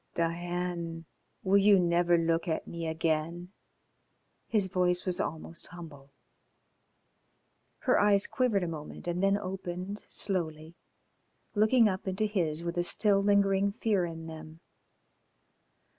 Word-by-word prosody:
"Diane, 170 Hz, 0 st, -3 dB, 0.4 s
will 195 Hz, +1 st, +4 dB
you 200 Hz, 0 st, +6 dB
never 175 Hz, 0 st, +3 dB
look 165 Hz, +1 st, 0 dB
at 160 Hz, -, -2 dB
me 170 Hz, -1 st, -5 dB
again?" 160 Hz, +2 st, -2 dB, 1.0 s
His 210 Hz, -4 st, +2 dB
voice 180 Hz, -1 st, 0 dB
was 180 Hz, -2 st, 0 dB
almost 160 Hz, +2 st, -4 dB
humble. 155 Hz, -6 st, -11 dB, 1.7 s
Her -, -, +3 dB
eyes 205 Hz, -1 st, +4 dB
quivered 235 Hz, -7 st, 0 dB
a -, -, -2 dB
moment 155 Hz, 0 st, -8 dB
and 175 Hz, +1 st, -1 dB
them 195 Hz, +1 st, +3 dB
opened 190 Hz, 0 st, -5 dB
slowly, 160 Hz, -5 st, -2 dB, 0.8 s
looking 220 Hz, +2 st, +4 dB
up 190 Hz, -1 st, -3 dB
into 190 Hz, +3 st, 0 dB
his 170 Hz, -6 st, -1 dB
with 170 Hz, 0 st, -4 dB
a -, -, +2 dB
still 200 Hz, +3 st, +3 dB
lingering 200 Hz, 0 st, +3 dB
fear 205 Hz, -4 st, 0 dB
in 165 Hz, -1 st, -7 dB
them. 160 Hz, 0 st, -10 dB
175 Hz, 125 wpm, -30 LUFS, 165-195 Hz, 1.7 s, you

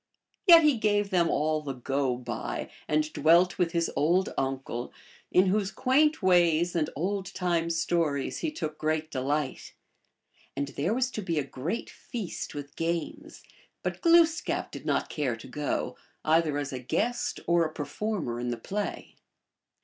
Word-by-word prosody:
Yet 335 Hz, -2 st, +10 dB
he 295 Hz, -5 st, +4 dB
gave 205 Hz, -2 st, +1 dB
them 175 Hz, -3 st, +3 dB
all 155 Hz, +1 st, +1 dB
the 140 Hz, -2 st, -4 dB
go 135 Hz, 0 st, -1 dB
by, 120 Hz, -2 st, -5 dB, 0.2 s
and 155 Hz, 0 st, 0 dB
dwelt 170 Hz, +4 st, +4 dB
with 170 Hz, -2 st, +2 dB
his 170 Hz, -1 st, 0 dB
old 175 Hz, +5 st, +2 dB
uncle, 135 Hz, -2 st, -3 dB, 0.4 s
in 185 Hz, -, +5 dB
whose 195 Hz, +1 st, +1 dB
quaint 265 Hz, +5 st, +2 dB
ways 175 Hz, -2 st, +4 dB
and 160 Hz, -3 st, +1 dB
old 190 Hz, +4 st, -2 dB
time 170 Hz, -2 st, 0 dB
stories 165 Hz, -4 st, 0 dB
he 320 Hz, -, -1 dB
took 155 Hz, -, -5 dB
great 155 Hz, 0 st, -1 dB
delight. 140 Hz, +1 st, -2 dB, 0.8 s
And 140 Hz, +1 st, -2 dB
there 170 Hz, +11 st, -1 dB
was 255 Hz, 0 st, 0 dB
to 215 Hz, -, -4 dB
be 170 Hz, -4 st, -2 dB
a 150 Hz, -, +2 dB
great 145 Hz, -, -4 dB
feast 215 Hz, -11 st, -6 dB
with 145 Hz, 0 st, -7 dB
games, 165 Hz, -1 st, -3 dB, 0.4 s
but -, -, -3 dB
Glooskap 335 Hz, -1 st, +3 dB
did -, -, -8 dB
not -, -, +1 dB
care 135 Hz, -6 st, -1 dB
to 115 Hz, -, -11 dB
go,. 145 Hz, +3 st, -2 dB, 0.3 s
either 155 Hz, -2 st, +3 dB
as 145 Hz, -2 st, -3 dB
a 130 Hz, -, -3 dB
guest 225 Hz, -, -1 dB
or 170 Hz, 0 st, +3 dB
a 155 Hz, -, -2 dB
performer 155 Hz, -, -3 dB
in 120 Hz, 0 st, -2 dB
the 120 Hz, -, -2 dB
play. 205 Hz, -, -5 dB
165 Hz, 160 wpm, -28 LUFS, 145-195 Hz, 0.8 s, Yet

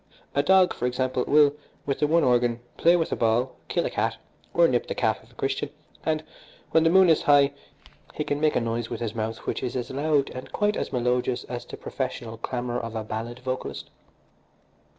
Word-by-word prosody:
A 140 Hz, -, +3 dB
dog, 185 Hz, +4 st, +5 dB
for 125 Hz, -, -2 dB
example, 125 Hz, 0 st, -1 dB
will, 145 Hz, -1 st, +5 dB, 0.3 s
with 140 Hz, -, -1 dB
the 150 Hz, -, +3 dB
one 165 Hz, +2 st, +3 dB
organ, 120 Hz, -1 st, +2 dB, 0.2 s
play 170 Hz, +1 st, +5 dB
with 165 Hz, -2 st, 0 dB
a -, -, +1 dB
ball, 120 Hz, +3 st, +1 dB
kill -, -, 0 dB
a -, -, -2 dB
cat, -, -, -1 dB, 0.3 s
or 170 Hz, -1 st, +5 dB
nip 125 Hz, -4 st, 0 dB
the -, -, -3 dB
calf -, -, 0 dB
of -, -, -21 dB
a -, -, -23 dB
Christian, -, -, -2 dB, 0.3 s
and, 155 Hz, 0 st, 0 dB, 0.5 s
when 160 Hz, -, +4 dB
the 165 Hz, -, +5 dB
moon 190 Hz, +2 st, +6 dB
is 160 Hz, -2 st, +4 dB
high, 145 Hz, -1 st, +5 dB, 0.6 s
he 150 Hz, -, -1 dB
can 145 Hz, 0 st, -2 dB
make 155 Hz, -1 st, +3 dB
a -, -, +2 dB
noise 115 Hz, 0 st, -2 dB
with 115 Hz, -, -4 dB
his 115 Hz, -3 st, -3 dB
mouth 110 Hz, 0 st, -3 dB
which -, -, -2 dB
is 125 Hz, -, -3 dB
as 125 Hz, -2 st, -3 dB
loud 145 Hz, 0 st, +1 dB
and 130 Hz, -, -8 dB
quite 210 Hz, 0 st, +1 dB
as -, -, -3 dB
melodious 125 Hz, 0 st, 0 dB
as 120 Hz, -1 st, -6 dB
the -, -, -9 dB
professional 115 Hz, -1 st, -4 dB
clamour 120 Hz, +1 st, -3 dB
of 115 Hz, -1 st, -6 dB
a 110 Hz, -, -2 dB
ballad 115 Hz, +3 st, -5 dB
vocalist. 130 Hz, 0 st, -4 dB
130 Hz, 210 wpm, -26 LUFS, 120-150 Hz, 0.6 s, moon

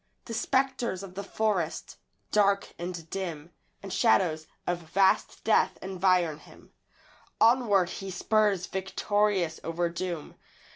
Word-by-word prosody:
The 230 Hz, -, -6 dB
spectres 240 Hz, -4 st, 0 dB
of 190 Hz, -2 st, -9 dB
the 195 Hz, -, -5 dB
forest, 200 Hz, -6 st, -2 dB, 0.3 s
dark 200 Hz, -1 st, +2 dB
and 175 Hz, -2 st, -5 dB
dim, 170 Hz, -4 st, -5 dB, 0.3 s
And 195 Hz, -, -6 dB
shadows 170 Hz, -9 st, +2 dB, 0.2 s
of 175 Hz, -1 st, -1 dB
vast 185 Hz, +4 st, +1 dB
death -, -, +3 dB
environ 185 Hz, -4 st, +1 dB
him -, -, -18 dB, 0.7 s
Onward 225 Hz, -6 st, +4 dB
he 195 Hz, -, -6 dB
spurs 200 Hz, 0 st, +1 dB
victorious 190 Hz, -2 st, 0 dB
over 170 Hz, +1 st, -1 dB
doom. 170 Hz, -2 st, -5 dB
190 Hz, 115 wpm, -28 LUFS, 175-205 Hz, 0.7 s, Onward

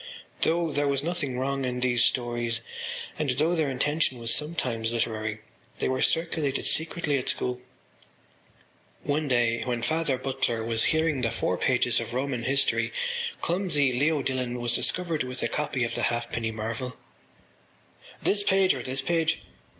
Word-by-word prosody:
Though 165 Hz, 0 st, +2 dB
there 145 Hz, 0 st, +1 dB
was 140 Hz, 0 st, +1 dB
nothing 155 Hz, -6 st, -2 dB
wrong 135 Hz, +1 st, -1 dB
in 125 Hz, -1 st, -2 dB
these 120 Hz, -1 st, +4 dB
stories 120 Hz, -2 st, +1 dB, 0.6 s
and 150 Hz, -3 st, 0 dB
though 150 Hz, +7 st, +2 dB
their 160 Hz, -4 st, +1 dB
intention 145 Hz, +1 st, +1 dB
was 115 Hz, -1 st, +1 dB
sometimes 125 Hz, -8 st, -1 dB
literary 110 Hz, -2 st, -2 dB, 0.4 s
they -, -, 0 dB
were 130 Hz, 0 st, 0 dB
circulated 160 Hz, -4 st, +1 dB
secretly 160 Hz, -3 st, +1 dB
at 125 Hz, -, -1 dB
school. 125 Hz, 0 st, -1 dB, 1.4 s
One 150 Hz, +1 st, 0 dB
day 120 Hz, -3 st, +2 dB
when 120 Hz, -2 st, -2 dB
Father 150 Hz, 0 st, +1 dB
Butler 130 Hz, -3 st, -1 dB
was 115 Hz, 0 st, +2 dB
hearing 160 Hz, -4 st, +2 dB
the 115 Hz, -, +2 dB
four 115 Hz, -5 st, 0 dB
pages 120 Hz, +3 st, +2 dB
of 115 Hz, +1 st, -5 dB
Roman 130 Hz, -3 st, -1 dB
History 135 Hz, +1 st, +2 dB, 0.5 s
clumsy 170 Hz, -7 st, +1 dB
Leo 145 Hz, +3 st, +2 dB
Dillon 125 Hz, -2 st, -1 dB
was 120 Hz, 0 st, +1 dB
discovered 165 Hz, +3 st, +1 dB
with 125 Hz, 0 st, -3 dB
a -, -, +2 dB
copy 140 Hz, -4 st, -1 dB
of 115 Hz, -, -1 dB
The -, -, -2 dB
Halfpenny 120 Hz, -1 st, -2 dB
Marvel. 115 Hz, +3 st, -4 dB, 1.3 s
“This 205 Hz, 0 st, +2 dB
page 195 Hz, -2 st, +4 dB
or 130 Hz, -, -4 dB
this 130 Hz, +2 st, -2 dB
page? 165 Hz, +1 st, +1 dB
130 Hz, 155 wpm, -27 LUFS, 120-150 Hz, 1.4 s, these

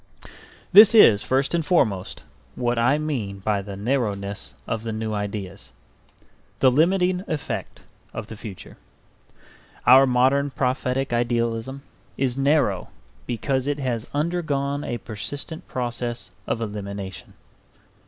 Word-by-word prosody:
This 210 Hz, +3 st, +9 dB
is, 110 Hz, -, +8 dB
first 135 Hz, +3 st, 0 dB
and 170 Hz, -1 st, +1 dB
foremost, 110 Hz, -, 0 dB, 0.3 s
what 120 Hz, -1 st, 0 dB
I 125 Hz, +5 st, +3 dB
mean 130 Hz, -11 st, -3 dB
by 100 Hz, +1 st, -1 dB
the 100 Hz, 0 st, -8 dB
narrowness 100 Hz, -3 st, -2 dB
of 115 Hz, -, -3 dB
the 115 Hz, 0 st, -4 dB
new 110 Hz, 0 st, -3 dB
ideas, 100 Hz, -2 st, -5 dB, 0.8 s
the 130 Hz, -, +5 dB
limiting 180 Hz, +5 st, +2 dB
effect 150 Hz, -3 st, -4 dB, 0.3 s
of -, -, -6 dB
the 110 Hz, -, -9 dB
future. 105 Hz, -3 st, -10 dB, 1.1 s
Our 130 Hz, +2 st, +8 dB
modern 130 Hz, +3 st, +3 dB
prophetic 130 Hz, -1 st, -1 dB
idealism 120 Hz, +2 st, -1 dB, 0.3 s
is 130 Hz, -2 st, 0 dB
narrow 135 Hz, -, +1 dB, 0.4 s
because 130 Hz, +2 st, -1 dB
it 145 Hz, 0 st, 0 dB
has 125 Hz, -5 st, -3 dB
undergone 145 Hz, -3 st, -1 dB
a 120 Hz, -, -3 dB
persistent 140 Hz, +9 st, -6 dB
process 120 Hz, -3 st, -3 dB, 0.2 s
of 115 Hz, -, -1 dB
elimination. 100 Hz, -3 st, -6 dB
125 Hz, 120 wpm, -24 LUFS, 110-140 Hz, 1.1 s, This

